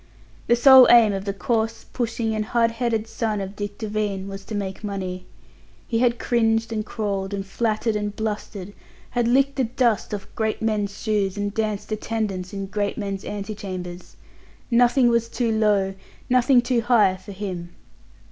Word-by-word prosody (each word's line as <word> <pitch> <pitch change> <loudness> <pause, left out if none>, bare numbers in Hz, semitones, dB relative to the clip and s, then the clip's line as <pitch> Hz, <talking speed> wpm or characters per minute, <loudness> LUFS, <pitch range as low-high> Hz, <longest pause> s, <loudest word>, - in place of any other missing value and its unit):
The 235 - +5
sole 260 +1 +9
aim 230 -4 +7
of 195 0 -4
the 200 - -1
coarse, 225 +3 -1
pushing 230 -2 -1
and 215 0 -1
hard 230 +1 +1
headed 230 -2 -1
son 225 -2 -2
of 195 +1 -5
Dick 205 0 -5
Devine 210 -3 -2
was 195 0 -7
to 215 - -5
make 195 0 -4
money. 185 -3 -4 0.6
He 230 - 0
had 240 -1 +2
cringed 225 -1 +1
and 215 -1 -1
crawled 200 -2 -3
and 195 -1 -4
fluttered 215 +2 -1
and 210 0 -2
blustered, 210 -2 -4 0.4
had 240 -1 +1
licked 275 +3 +2
the 260 - +2
dust 235 -2 0
off 205 -2 -4
great 220 -1 -1
men's 210 -2 -1
shoes, 205 -3 0
and 205 0 -2
danced 215 -1 -2
attendance 210 -4 -3
in 195 -1 -4
great 200 +1 -2
men's 200 -2 -4
ante 205 +1 -5
chambers. 180 -3 -7 0.5
Nothing 245 +2 +4
was 235 -1 +1
too 235 -2 -1
low, 205 -3 +2 0.4
nothing 250 0 +5
too 240 -1 +1
high 220 -6 +4
for 190 +2 -11
him. 185 -3 -6
215 Hz, 170 wpm, -23 LUFS, 200-230 Hz, 0.6 s, sole